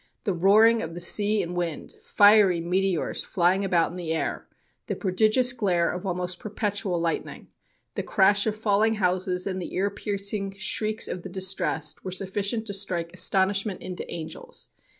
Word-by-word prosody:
"The 205 Hz, -6 st, -1 dB
roaring 215 Hz, +6 st, +4 dB
of 165 Hz, +1 st, -6 dB
the -, -, -6 dB
sea 205 Hz, +3 st, +3 dB
and 175 Hz, +1 st, -6 dB
wind, 170 Hz, -3 st, -3 dB
fiery 205 Hz, -4 st, +5 dB
meteors 180 Hz, 0 st, -1 dB
flying 185 Hz, +1 st, +1 dB
about 175 Hz, -4 st, +1 dB
in 180 Hz, -, -8 dB
the 165 Hz, -3 st, -3 dB
air, 160 Hz, -, -3 dB, 0.4 s
the -, -, -2 dB
prodigious 215 Hz, +6 st, +2 dB
glare 185 Hz, -8 st, +1 dB
of 180 Hz, +2 st, -6 dB
almost 180 Hz, 0 st, -2 dB
perpetual 205 Hz, -4 st, -2 dB
lightning, 165 Hz, 0 st, -4 dB, 0.4 s
the -, -, -3 dB
crash 200 Hz, +1 st, +2 dB
of 215 Hz, -, -1 dB
falling 215 Hz, +1 st, +1 dB
houses, 185 Hz, -1 st, 0 dB
and 185 Hz, -1 st, -3 dB
the -, -, -7 dB
ear 200 Hz, +2 st, 0 dB
piercing 200 Hz, 0 st, -3 dB
shrieks 215 Hz, +2 st, 0 dB
of 180 Hz, -, -5 dB
the -, -, -8 dB
distressed, 185 Hz, -5 st, -1 dB
were -, -, -5 dB
sufficient 200 Hz, +4 st, -1 dB
to 205 Hz, -, -5 dB
strike 180 Hz, -4 st, -1 dB
astonishment 195 Hz, 0 st, 0 dB
into 180 Hz, -1 st, -7 dB
angels. 160 Hz, -1 st, -7 dB
195 Hz, 165 wpm, -25 LUFS, 180-205 Hz, 0.4 s, fiery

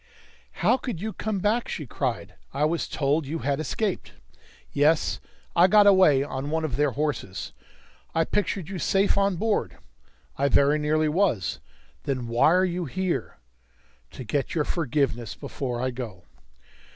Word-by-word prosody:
"How 255 Hz, -, +5 dB
could 245 Hz, -9 st, -5 dB
you 215 Hz, +3 st, -4 dB
come 215 Hz, -2 st, -3 dB
back?" 210 Hz, +5 st, 0 dB
she 155 Hz, -, -4 dB
cried. -, -, -3 dB, 0.2 s
"I 145 Hz, +2 st, +2 dB
was 165 Hz, +2 st, -1 dB
told 145 Hz, +1 st, 0 dB
you 160 Hz, +4 st, -3 dB
had 140 Hz, -2 st, -1 dB
escaped!" 185 Hz, -, -2 dB, 0.6 s
"Yes, 150 Hz, +3 st, +2 dB, 0.4 s
I 175 Hz, +2 st, +6 dB
got 210 Hz, +1 st, +6 dB
away 185 Hz, -9 st, +6 dB
on 140 Hz, 0 st, -4 dB
one 160 Hz, +1 st, 0 dB
of 135 Hz, -6 st, -3 dB
their 145 Hz, +1 st, +2 dB
horses." 140 Hz, -10 st, -3 dB, 0.6 s
"I 165 Hz, 0 st, +3 dB
pictured 200 Hz, -3 st, -1 dB
you 190 Hz, -1 st, -5 dB
safe 195 Hz, +4 st, +2 dB
on 200 Hz, -1 st, +2 dB
board!" 215 Hz, +4 st, -1 dB, 0.6 s
"I 140 Hz, +1 st, +2 dB
very 145 Hz, +3 st, +4 dB
nearly 155 Hz, +1 st, +1 dB
was." 155 Hz, -, 0 dB, 0.5 s
"Then 130 Hz, -4 st, -2 dB
why 120 Hz, +6 st, +4 dB
are 185 Hz, +2 st, +4 dB
you 175 Hz, -1 st, -2 dB
here?" 180 Hz, -, -3 dB, 0.8 s
"To -, -, -7 dB
get 135 Hz, +5 st, -2 dB
your 155 Hz, -, +2 dB
forgiveness 125 Hz, -, -1 dB
before 125 Hz, +4 st, -4 dB
I 130 Hz, +1 st, -1 dB
go." 115 Hz, -8 st, -7 dB
155 Hz, 155 wpm, -26 LUFS, 135-185 Hz, 0.8 s, I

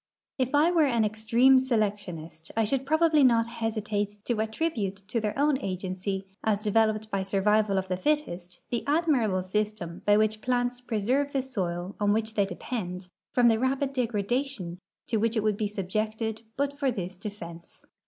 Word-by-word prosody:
If 260 Hz, +2 st, +1 dB
I 310 Hz, +4 st, +5 dB
were 325 Hz, -4 st, +4 dB
an 235 Hz, -4 st, +2 dB
extreme 230 Hz, +5 st, +4 dB
selectionist 200 Hz, -10 st, -2 dB
I 225 Hz, -, +4 dB
should 270 Hz, +5 st, 0 dB
probably 315 Hz, -1 st, +4 dB
not 230 Hz, -3 st, +5 dB
hesi 225 Hz, -2 st, -3 dB
tate 205 Hz, -1 st, -2 dB
to 235 Hz, -3 st, 0 dB
attribute 220 Hz, -, -1 dB
to 200 Hz, +4 st, -3 dB
their 210 Hz, +2 st, -2 dB
own 285 Hz, -1 st, +3 dB
agency, 190 Hz, 0 st, -3 dB, 0.2 s
as 210 Hz, -1 st, +1 dB
developed 215 Hz, 0 st, +1 dB
by 195 Hz, -, 0 dB
survival 200 Hz, +1 st, +2 dB
of 190 Hz, 0 st, -1 dB
the 185 Hz, -, -1 dB
fittest, 185 Hz, -9 st, -2 dB
the 235 Hz, -, -1 dB
admirable 275 Hz, -, +2 dB
system 190 Hz, -3 st, -3 dB
by 205 Hz, 0 st, +6 dB
which 215 Hz, 0 st, +2 dB
the -, -, -26 dB
plants 245 Hz, 0 st, 0 dB
pre 225 Hz, -4 st, -2 dB
serve 275 Hz, +7 st, +1 dB
the 270 Hz, -2 st, +1 dB
soil 185 Hz, -7 st, -3 dB
on 205 Hz, -1 st, +3 dB
wliich 220 Hz, 0 st, -1 dB
they 200 Hz, -3 st, +2 dB
depend 180 Hz, -2 st, -5 dB, 0.2 s
from 245 Hz, -1 st, +4 dB
the 225 Hz, -1 st, +4 dB
rapid 270 Hz, +2 st, 0 dB
degradation 235 Hz, -5 st, -1 dB, 0.3 s
to 225 Hz, -, 0 dB
which 225 Hz, +2 st, +1 dB
it 215 Hz, -, +1 dB
would 215 Hz, -1 st, +2 dB
be 210 Hz, 0 st, -1 dB
subjected 215 Hz, +3 st, -2 dB, 0.2 s
but 280 Hz, 0 st, 0 dB
for 275 Hz, -2 st, +2 dB
this 190 Hz, -6 st, -4 dB
defense. 175 Hz, -4 st, -9 dB
215 Hz, 180 wpm, -28 LUFS, 195-250 Hz, 0.3 s, by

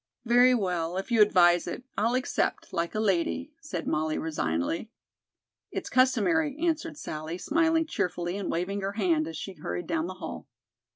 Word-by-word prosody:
"Very 245 Hz, +2 st, +6 dB
well, 180 Hz, -5 st, -1 dB
if 195 Hz, +5 st, -4 dB
you 230 Hz, -2 st, +5 dB
advise 175 Hz, -4 st, +5 dB
it, -, -, -5 dB
I'll 230 Hz, +3 st, +1 dB
accept, 255 Hz, -5 st, -1 dB
like 170 Hz, +2 st, -1 dB
a -, -, 0 dB
lady," 215 Hz, -, 0 dB
said 295 Hz, -, -5 dB
Molly 155 Hz, 0 st, 0 dB
resignedly. 155 Hz, -, -2 dB, 0.8 s
"It's -, -, -5 dB
customary," 265 Hz, +4 st, +3 dB
answered 325 Hz, -1 st, -1 dB
Sallie, 155 Hz, -, -5 dB
smiling 325 Hz, -, +2 dB
cheerfully 175 Hz, -, -2 dB
and 200 Hz, -1 st, -3 dB
waving 195 Hz, +4 st, -1 dB
her 195 Hz, +1 st, -2 dB
hand 170 Hz, -7 st, +1 dB
as 160 Hz, -1 st, -6 dB
she 195 Hz, -, -6 dB
hurried 175 Hz, +1 st, -5 dB
down 325 Hz, +1 st, -1 dB
the -, -, -6 dB
hall. -, -, -7 dB
200 Hz, 165 wpm, -28 LUFS, 170-260 Hz, 0.8 s, Very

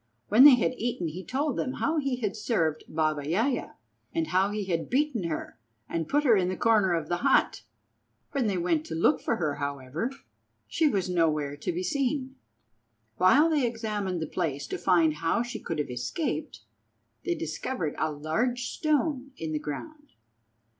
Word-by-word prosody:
When 235 Hz, +7 st, +8 dB
they 285 Hz, -3 st, +10 dB
had 245 Hz, -, 0 dB
eaten 225 Hz, -8 st, -2 dB
he 180 Hz, +5 st, -7 dB
told 280 Hz, +4 st, -1 dB
them 260 Hz, -, -1 dB
how 320 Hz, +2 st, 0 dB
he 275 Hz, -3 st, 0 dB
had 220 Hz, -4 st, -3 dB
served 170 Hz, -8 st, -1 dB
Baba 155 Hz, -1 st, 0 dB
Yaja, 220 Hz, -, -1 dB, 0.4 s
and 165 Hz, -1 st, 0 dB
how 190 Hz, +2 st, +2 dB
he 205 Hz, -1 st, -3 dB
had 170 Hz, -3 st, -2 dB
beaten 265 Hz, -, +1 dB
her 155 Hz, -7 st, -4 dB, 0.3 s
and 165 Hz, -2 st, -3 dB
put 290 Hz, +1 st, +2 dB
her 245 Hz, -6 st, +5 dB
in 185 Hz, -2 st, +2 dB
the 185 Hz, -, -3 dB
corner 210 Hz, -6 st, +3 dB
of 160 Hz, -2 st, -2 dB
the 175 Hz, -, 0 dB
hut. 175 Hz, -, +2 dB, 0.7 s
When 275 Hz, -5 st, 0 dB
they 195 Hz, -3 st, 0 dB
went 170 Hz, -3 st, +1 dB
to 160 Hz, -, -4 dB
look 170 Hz, -, +3 dB
for 230 Hz, -, 0 dB
her, 150 Hz, -7 st, -2 dB
however, 140 Hz, -, -3 dB, 0.6 s
she 320 Hz, -, +2 dB
was 195 Hz, -8 st, 0 dB
nowhere 155 Hz, -5 st, +1 dB
to 145 Hz, -, -2 dB
be 175 Hz, +2 st, -3 dB
seen. 265 Hz, +5 st, -1 dB, 0.8 s
While 265 Hz, -, +5 dB
they 300 Hz, -4 st, +2 dB
examined 210 Hz, -7 st, -3 dB
the -, -, -2 dB
place 145 Hz, -6 st, -2 dB
to -, -, -3 dB
find 170 Hz, -4 st, +3 dB
how 165 Hz, +9 st, +1 dB
she 240 Hz, -2 st, -6 dB
could 165 Hz, -, -4 dB
have 150 Hz, -4 st, -2 dB
escaped, 125 Hz, +2 st, -3 dB, 0.6 s
they 170 Hz, -, 0 dB
discovered 160 Hz, -, -3 dB
a 155 Hz, -, 0 dB
large 195 Hz, -, -1 dB
stone 290 Hz, -3 st, 0 dB
in 160 Hz, -1 st, -4 dB
the 155 Hz, -, -1 dB
ground. 295 Hz, -, -7 dB
185 Hz, 180 wpm, -28 LUFS, 160-250 Hz, 0.8 s, they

